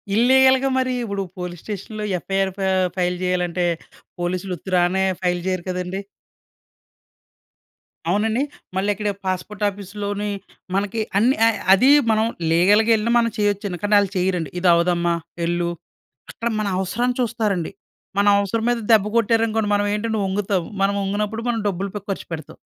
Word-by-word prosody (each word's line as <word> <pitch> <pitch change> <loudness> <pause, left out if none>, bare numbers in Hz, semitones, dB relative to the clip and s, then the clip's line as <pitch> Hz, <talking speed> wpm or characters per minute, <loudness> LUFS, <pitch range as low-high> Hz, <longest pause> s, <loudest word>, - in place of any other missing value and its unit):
ఇల్లిగల్‌గా 265 +3 +5
మరి 255 0 +1
ఇప్పుడు 200 -3 -3 0.2
పోలీస్ 175 -2 -6
స్టేషన్‌లో 215 +1 -6
యఫ్ఐఆర్ 195 +2 -1
ఫై 195 -1 -1 0.3
ఫైల్ 180 0 0
చేయాలంటే 180 -1 0 0.6
పోలీస్‌లు 180 +1 -2
ఉత్తురానే 185 +2 +1 0.2
ఫైల్ 180 -1 0
చేయరు 185 -2 -1
కదండీ! 180 +1 -3 2.1
అవునండి. 220 +6 +1 0.3
మళ్ళీ 195 +2 0
ఇక్కడ 210 +1 -2 0.2
పాస్‌పోర్ట్ 190 +3 -3
ఆఫీస్‌లోని 205 +1 -4 0.5
మనకి 205 +3 -1 0.2
అన్ని 240 +6 +4 0.4
అది 250 +8 +5 0.2
మనం 220 0 +2 0.3
లీగల్‌గా 205 +7 +4
ఎళ్ళినా 220 +2 0
మనం 230 -1 +1
చెయ్యొచ్చండి. 205 -3 -1
కానీ 205 0 +3
ఆళ్ళు 200 -2 0
చెయ్యరండి. 180 -4 0
"ఇది 180 - +1
అవ్వదమ్మా. 170 0 +2 0.3
ఎళ్ళు." 175 0 0 0.6
అక్కడ 235 0 -3
మన 210 - -1
అవసరాన్ని 240 +6 -1
చూస్తారండి. 210 -7 -1 0.5
మన 200 0 +3
అవసరం 200 +3 -1
మీద 240 -1 +1
దెబ్బ 215 -3 +6
కొట్టారనుకోండి 225 -1 +2
మనం 205 0 +1
ఏంటంటే 220 +1 -1
వంగుతాం. 190 -1 0 0.2
మనం 195 +1 +3
వంగినప్పుడు 210 +3 -2
మనం 230 -1 0
డబ్బులుపై 195 +1 -3
ఖర్చు 195 - -3
పెడతాం. 160 -1 -7
200 Hz, 135 wpm, -22 LUFS, 180-220 Hz, 2.1 s, దెబ్బ